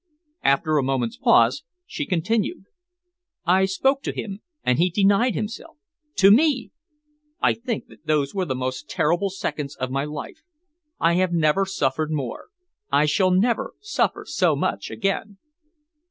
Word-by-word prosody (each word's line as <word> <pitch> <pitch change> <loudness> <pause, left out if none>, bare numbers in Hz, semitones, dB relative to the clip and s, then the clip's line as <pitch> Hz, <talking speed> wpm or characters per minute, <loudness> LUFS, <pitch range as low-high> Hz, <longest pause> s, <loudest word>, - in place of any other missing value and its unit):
After 150 +2 +2
a - - 0
moment's 130 -3 -1
pause 115 +2 +4 0.2
she 145 - -5
continued: 195 +4 -1 0.8
"I 185 +2 +4
spoke 265 +9 +1
to - - -3
him, 200 -2 -6 0.2
and 125 - +2
he 180 +2 +4
denied 200 +6 +3
himself. 230 +10 -5 0.4
To 195 0 +6
me! 265 +1 +3 0.7
I - - +3
think 235 -2 -4
that - - -19
those 150 -3 +1
were 190 -2 -1
the 130 - -2
most 130 +2 -4
terrible 175 +6 +1
seconds 150 -6 -4
of 130 0 -4
my 135 +1 -1
life. 150 - -7 0.6
I 165 +1 +3
have 185 -1 +1
never 165 +4 +2
suffered 155 -3 -1
more. 135 -6 -4 0.4
I 150 - +4
shall 185 +5 +2
never 240 - +1
suffer 420 - -1
so - - +1
much - - -2
again." 200 0 -2
180 Hz, 150 wpm, -23 LUFS, 145-205 Hz, 0.8 s, To